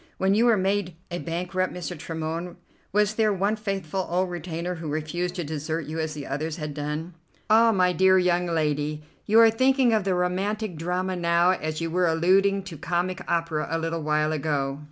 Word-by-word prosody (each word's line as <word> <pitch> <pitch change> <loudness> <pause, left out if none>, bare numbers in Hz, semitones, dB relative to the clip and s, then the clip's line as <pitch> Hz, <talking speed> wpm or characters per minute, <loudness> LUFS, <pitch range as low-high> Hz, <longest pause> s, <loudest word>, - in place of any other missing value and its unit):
When 190 +1 +2
you 225 +4 +3
were 230 -3 +5
made 190 -2 0 0.2
a 175 - -3
bankrupt, 180 +3 -2
Mr. 180 0 -5
Tremorne, 165 +2 -5 0.4
was 210 +1 +2
there 215 -1 +2
one 200 +2 +1
faithful 195 -4 -3
old 180 +1 0
retainer 175 0 -4
who 165 -2 -7
refused 175 +4 -2
to 175 - -2
desert 155 +1 -3
you 155 +3 -5
as 155 -1 -2
the 145 -2 -6
others 155 +4 -3
had 150 -2 -5
done?" 150 +4 -4 0.4
"Ah, 225 +1 +6
my 180 -3 +3
dear 190 +2 +5
young 180 -1 +2
lady, 150 -2 -1 0.2
you 220 +2 +5
are 225 -1 +7
thinking 260 +1 +3
of 215 -2 +2
the 190 -1 0
romantic 190 +3 -1
drama 180 +3 -2
now, 170 +1 +3
as 155 -3 -3
you 165 0 -2
were 180 +1 +2
alluding 190 +4 +3
to 180 -4 -8
comic 180 +1 -1
opera 165 -2 0
a 165 - 0
little 165 0 -2
while 150 0 +1
ago. 140 -2 -1
175 Hz, 195 wpm, -25 LUFS, 160-190 Hz, 0.4 s, are